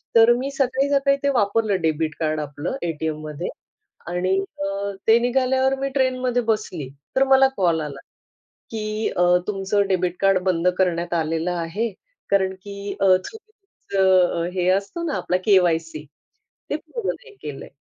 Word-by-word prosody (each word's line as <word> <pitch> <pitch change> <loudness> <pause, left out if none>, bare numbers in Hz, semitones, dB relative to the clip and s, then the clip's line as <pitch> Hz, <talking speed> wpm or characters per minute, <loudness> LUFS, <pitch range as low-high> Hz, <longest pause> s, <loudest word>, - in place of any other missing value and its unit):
तर 230 +1 +7
मी 270 +2 -3
सकाळी 270 0 0
सकाळी 275 0 +3
ते 280 - +3
वापरलं 205 -3 +1
डेबिट 155 -1 0
कार्ड 155 -1 0
आपलं 145 - -4
एटीएममध्ये 155 0 -3 0.6
आणि 185 +2 0 0.3
अ, 200 +1 -2 0.2
ते 225 +1 +6
निघाल्यावर 260 +2 +2
मी 275 0 -1
ट्रेन 260 -1 +1
मध्ये 245 -1 +1
बसली 185 -11 -2 0.3
तर 265 - +5
मला 270 0 +6
कॉल 170 -4 +2
आला 140 -2 -6 0.7
की 215 0 -2
अ, 180 - +4 0.2
तुमचं 200 0 0
डेबिट 180 -2 0
कार्ड 195 -1 +4
बंद 180 -2 +1
करण्यात 175 -2 0
आलेलं 165 +2 -1
आहे 175 +7 -2 0.4
कारण 190 -1 +2
की 200 0 -6
अ, - - +4
तुमचं 190 - 0
हे 180 -1 0
असतो 200 - 0
ना 310 -4 -2
आपला 180 - 0
केवायसी 165 -6 +2 0.6
ते - - 0
पूर्ण 470 -5 -5
नाही 470 -3 -6
केलंय. 145 -2 -7
195 Hz, 150 wpm, -22 LUFS, 170-250 Hz, 0.7 s, तर